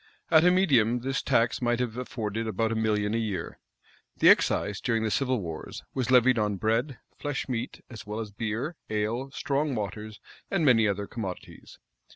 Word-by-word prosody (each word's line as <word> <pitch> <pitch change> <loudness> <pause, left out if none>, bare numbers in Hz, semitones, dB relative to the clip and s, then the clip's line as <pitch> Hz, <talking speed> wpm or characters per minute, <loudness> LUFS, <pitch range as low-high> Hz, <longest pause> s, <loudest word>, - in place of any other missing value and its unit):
At 160 -1 +7
a 180 - +6
medium, 130 - +3
this 135 +2 -1
tax 120 -3 +1
might 120 0 +1
have 120 -3 -2
afforded 115 -3 -4
about 110 +2 0
a - - -1
million 105 -1 0
a 115 - +1
year. 100 -7 -4 0.6
The - - +6
excise, 105 -2 +3
during 115 -2 0
the 110 - -1
civil 130 -1 +1
wars, 80 -5 -7
was 130 -2 -2
levied 125 -1 +5
on 105 -1 0
bread, 115 +6 0 0.2
flesh 145 -2 -3
meat, 125 -1 -4
as 115 -5 -9
well 105 +1 -5
as 110 -2 -5
beer, 115 - -3
ale, 110 +5 -1
strong 140 +1 -1
waters 105 0 -5 0.3
and 185 -5 +1
many 115 -5 +5
other 100 0 -1
commodities. 100 -4 -8
115 Hz, 180 wpm, -27 LUFS, 105-130 Hz, 0.6 s, At